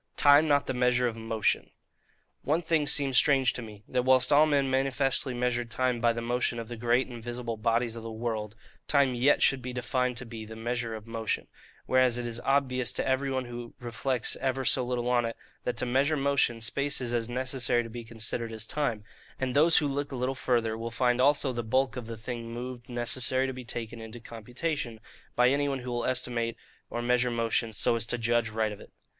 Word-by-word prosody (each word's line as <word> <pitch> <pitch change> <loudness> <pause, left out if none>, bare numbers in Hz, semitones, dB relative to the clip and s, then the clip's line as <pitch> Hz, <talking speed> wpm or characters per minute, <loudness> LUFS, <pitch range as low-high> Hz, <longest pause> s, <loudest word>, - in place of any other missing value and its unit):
Time 145 +2 +6
not 145 -1 +3
the - - -2
Measure 125 0 +2
of 115 - -3
Motion 115 -1 0 0.7
One 160 +4 0
thing 160 -2 +1
seems 135 -4 +3
strange 135 -2 +4
to - - -5
me,—that 110 +3 -4
whilst 130 +2 +4
all 150 +2 +6
men 140 -2 +2
manifestly 135 0 +1
measured 120 -1 -1
time 125 -1 0
by 120 -1 +4
the 115 0 -4
motion 120 0 0
of 115 -1 -6
the 120 - -5
great 120 +3 +2
and 120 -3 -9
visible 120 -1 -4
bodies 115 +1 0
of 115 - -6
the 115 - -6
world, 110 -2 -3 0.3
time 140 -3 +3
yet 125 +4 +3
should 135 -1 +3
be 125 +1 -5
defined 125 0 -1
to 125 - -5
be 115 -1 -7
the 110 +1 -9
'measure 115 0 -3
of 110 -1 -9
motion': 115 -1 -2 0.4
whereas 130 -2 +3
it 120 - -3
is 120 0 -4
obvious 130 -3 +1
to - - -2
every 135 +1 +1
one 130 -1 -1
who 120 -1 -8
reflects 125 0 -2
ever 130 0 -1
so 130 - +3
little 125 -1 -2
on 125 -1 +3
it, 115 0 -4 0.3
that 125 -1 -2
to - - 0
measure 135 +5 +2
motion, 135 -4 +1
space 140 +6 0
is 120 -2 -3
as 115 -1 -1
necessary 125 -1 0
to - - -7
be 120 0 -6
considered 115 0 -4
as 110 -1 -3
time; 115 -6 -2 0.4
and 130 -1 -2
those 160 +3 +6
who 150 - +3
look 140 +1 -3
a - - -4
little 125 +1 -1
farther 120 -4 0
will 115 +1 -4
find 125 +1 +1
also 140 0 +3
the 120 - -2
bulk 130 +4 +1
of 125 -3 -6
the 115 -1 -6
thing 115 +1 -6
moved 120 +1 -7
necessary 125 +2 0
to 130 - -3
be 130 0 -8
taken 115 -1 -5
into 110 +1 -9
the 115 - -14
computation, 120 +2 -4 0.4
by 125 +1 +5
any 140 +1 +1
one 135 - -1
who 125 -1 -6
will 120 -1 -1
estimate 120 -2 -1 0.3
or 120 - -3
measure 125 +1 +2
motion 115 -1 0
so 110 +2 +2
as 115 -1 -1
to 120 - -1
judge 115 0 +1
right 110 0 -1
of 105 - -8
it. - - -14
125 Hz, 220 wpm, -29 LUFS, 115-130 Hz, 0.7 s, Time